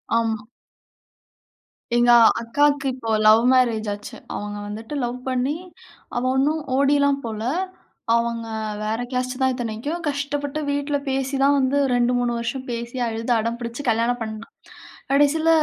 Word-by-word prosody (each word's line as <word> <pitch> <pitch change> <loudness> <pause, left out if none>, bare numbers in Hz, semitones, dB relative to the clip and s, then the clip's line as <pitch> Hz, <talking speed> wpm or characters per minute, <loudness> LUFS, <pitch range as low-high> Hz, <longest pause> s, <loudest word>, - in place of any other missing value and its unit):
ஆமா. 220 -2 0 1.5
"எங்க 240 0 +5 0.3
அக்காவுக்கு 285 +4 +2
இப்போ 230 -3 -6 0.2
லவ் 220 +2 +7
மேரேஜ் 230 -4 +2
ஆச்சு. 205 +1 -9 0.2
அவுங்க 205 0 -5
வந்துட்டு 220 +6 -7
லவ் 245 +1 -3
பண்ணி 260 +4 0 0.6
அவ 240 - 0
ஒண்ணும் 300 +3 +1
ஓடிலாம் 280 0 +3
போல." 220 -1 -4 0.7
அவுங்க 235 0 -1 0.4
வேற 220 +2 -1
கேஸ்ட்டு 255 +1 -2
தான் 260 -1 +3
இத்தனைக்கும். 245 +8 -4
கஷ்டப்பட்டு 285 +1 -3
வீட்டுல 285 0 0
பேசி 270 +1 -1
தான் 285 +1 +5
வந்து 265 +2 +1 0.2
2, 245 0 +2
3 245 -1 0
வருஷம் 255 +3 -4
பேசி 235 +1 -5
அழுது 230 +2 -3
அடம் 230 +2 -2
பிடிச்சு 235 +3 -5
கல்யாணம் 230 +2 +1
பண்ணா. 220 0 -5 0.7
கடைசியில 290 +3 +3
245 Hz, 135 wpm, -23 LUFS, 230-280 Hz, 1.5 s, லவ்